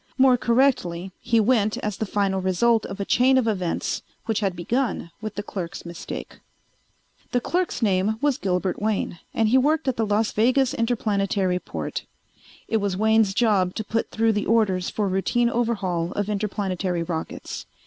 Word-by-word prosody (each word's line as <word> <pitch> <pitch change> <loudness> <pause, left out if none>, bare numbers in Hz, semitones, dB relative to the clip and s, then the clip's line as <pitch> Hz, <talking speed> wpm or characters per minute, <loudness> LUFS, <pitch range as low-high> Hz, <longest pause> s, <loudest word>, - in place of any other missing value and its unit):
More 260 -1 +6
correctly, 230 -8 +1
he 230 - +2
went 215 -2 +2
as 210 -2 -3
the 220 - -2
final 195 -1 0
result 220 +5 +2
of 195 - -7
a 200 - -2
chain 260 +5 +4
of 250 -3 +2
events 185 -6 -1 0.2
which 225 -2 0
had 195 -4 -1
begun 225 0 -1
with 215 -1 -5
the 205 - -3
clerk's 180 -5 -6
mistake. 170 -1 -7 0.9
The 245 - +3
clerk's 345 0 -1
name 200 +1 +2
was 285 -1 +1
Gilbert 185 0 -1
Wayne 210 -5 -1
and 220 -1 +1
he 260 +3 +5
worked 305 +3 +1
at 260 - 0
the 225 - +1
Las 210 +1 +1
Vegas 255 +4 +2
Interplanetary 200 -5 0
Port. - - -5 0.6
It 225 - +1
was 200 -3 -1
Wayne's 220 -1 +3
job 200 -6 +2
to 220 - -2
put 225 +2 -2
through 225 0 +2
the 210 - -1
orders 200 -5 +2
for 210 -2 -1
routine 235 +6 +1
overhaul 195 -8 -1
of 205 0 -2
interplanetary 195 -4 -1
rockets. 165 -1 -5
210 Hz, 170 wpm, -24 LUFS, 190-235 Hz, 0.9 s, More